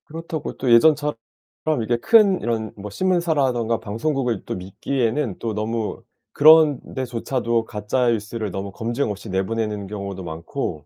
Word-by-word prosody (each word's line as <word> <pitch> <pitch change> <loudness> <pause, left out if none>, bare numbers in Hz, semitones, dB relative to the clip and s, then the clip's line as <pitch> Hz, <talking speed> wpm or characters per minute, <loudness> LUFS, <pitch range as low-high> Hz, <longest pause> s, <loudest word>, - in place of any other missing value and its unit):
그렇다고 165 0 -5
또 130 - 0
예전처럼 150 +4 +5 0.7
이렇게 120 +2 0
큰 205 - +5
이런 110 -2 -2
뭐 105 0 -7
신문사라든가 140 - +1
방송국을 120 +1 -2
또 - - -4
믿기에는 115 +5 -2
또 115 -2 -3
너무 110 +1 -3 0.3
그런 155 -2 +7
데조차도 120 -2 -1
가짜 110 +4 -1
뉴스를 110 -2 -1
너무 95 +1 -5
검증 120 +3 -2
없이 105 +2 -8
내보내는 105 +1 -2
경우도 100 -2 -6
많고 80 -2 -5
115 Hz, 330 characters per minute, -22 LUFS, 105-140 Hz, 0.7 s, 그런